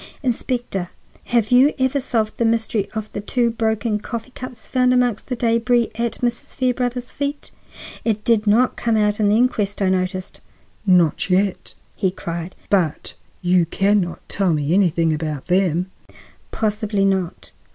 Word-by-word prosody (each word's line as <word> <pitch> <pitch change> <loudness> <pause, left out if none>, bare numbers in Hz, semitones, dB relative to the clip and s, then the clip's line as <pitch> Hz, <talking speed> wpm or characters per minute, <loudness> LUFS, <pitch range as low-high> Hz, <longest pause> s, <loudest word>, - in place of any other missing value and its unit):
Inspector, 240 -7 -2 0.4
have 235 -2 +1
you 260 +4 +5
ever 260 +1 +1
solved 225 -4 -1
the - - +2
mystery 225 -2 0
of 215 -1 -4
the - - -3
two 235 +3 +1
broken 220 -1 0
coffee 235 +3 -6
cups 250 -3 -9
found 255 -1 +2
amongst 245 -4 +1
the 250 - -2
debris 235 0 +2
at 235 0 -3
Mrs. 240 -1 -2
Fairbrother's 250 -1 -1
feet? 285 +1 -4 0.5
It 215 -2 -1
did 220 -2 +2
not 235 +5 +4
come 230 -2 +1
out 210 0 +1
in 210 -1 +3
the 210 - +4
inquest, 215 -5 +1
I 195 -2 +2
noticed." 185 0 -2 0.5
"Not 180 -2 +3
yet," 190 +1 0 0.2
he 190 - +1
cried, 170 -1 -6 0.2
"but—you 180 0 0
can 200 +4 +2
not 175 -1 -6
tell 190 -4 +1
me 150 +1 0
anything 170 -4 +3
about 155 -3 -3
them!" 180 0 +1 0.6
"Possibly 210 -2 0
not. 190 -3 -1
215 Hz, 150 wpm, -21 LUFS, 185-240 Hz, 0.6 s, you